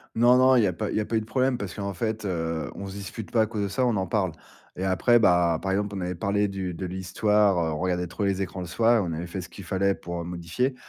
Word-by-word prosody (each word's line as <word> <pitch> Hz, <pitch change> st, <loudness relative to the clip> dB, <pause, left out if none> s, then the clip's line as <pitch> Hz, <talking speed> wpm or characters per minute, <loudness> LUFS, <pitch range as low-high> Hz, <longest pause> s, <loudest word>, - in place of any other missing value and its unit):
Non, 120 Hz, +2 st, +6 dB
non, 130 Hz, 0 st, +6 dB
il 120 Hz, -, +5 dB
y -, -, +4 dB
a 90 Hz, -, +1 dB
pas 80 Hz, -, -3 dB
il -, -, -3 dB
y -, -, +2 dB
a -, -, -1 dB
pas 115 Hz, -, -2 dB
eu -, -, +3 dB
de 110 Hz, -, -8 dB
problème, 130 Hz, +1 st, +1 dB
parce 100 Hz, -6 st, -5 dB
qu'en 100 Hz, -2 st, -4 dB
fait, 110 Hz, +4 st, -2 dB
heu, 80 Hz, -4 st, -2 dB
on 100 Hz, -, -6 dB
se 95 Hz, -, -8 dB
dispute 100 Hz, +2 st, -7 dB
pas 115 Hz, -, +3 dB
à -, -, +2 dB
cause 105 Hz, -1 st, -3 dB
de 100 Hz, -, 0 dB
ça, 100 Hz, +6 st, 0 dB
on 115 Hz, -4 st, +1 dB
en 95 Hz, -, 0 dB
parle. 95 Hz, -1 st, 0 dB, 0.4 s
Et 95 Hz, -, -3 dB
après 95 Hz, +6 st, +4 dB
bah, 90 Hz, -6 st, +4 dB
par 95 Hz, -, -1 dB
exemple, 100 Hz, +1 st, -1 dB
on -, -, -3 dB
avait 90 Hz, 0 st, -2 dB
parlé 100 Hz, +3 st, +1 dB
du 95 Hz, -2 st, -4 dB
de 90 Hz, +2 st, -5 dB
l'histoire, 95 Hz, +2 st, +2 dB
heu, 80 Hz, -2 st, 0 dB
on 75 Hz, -, -3 dB
regardait 90 Hz, 0 st, -1 dB
trop 90 Hz, +4 st, -4 dB
les 100 Hz, -1 st, 0 dB
écrans 95 Hz, 0 st, -5 dB
le 90 Hz, -, -5 dB
soir 115 Hz, +7 st, +3 dB
et -, -, +3 dB
on 85 Hz, -, -3 dB
avait 80 Hz, +2 st, -4 dB
fait 90 Hz, +2 st, -5 dB
ce 90 Hz, -, -8 dB
qu'il 100 Hz, -, -11 dB
fallait 95 Hz, +3 st, +1 dB
pour, 85 Hz, -1 st, -6 dB
heu, -, -, -5 dB
modifier. 90 Hz, +10 st, -2 dB
95 Hz, 315 wpm, -26 LUFS, 90-110 Hz, 0.4 s, Non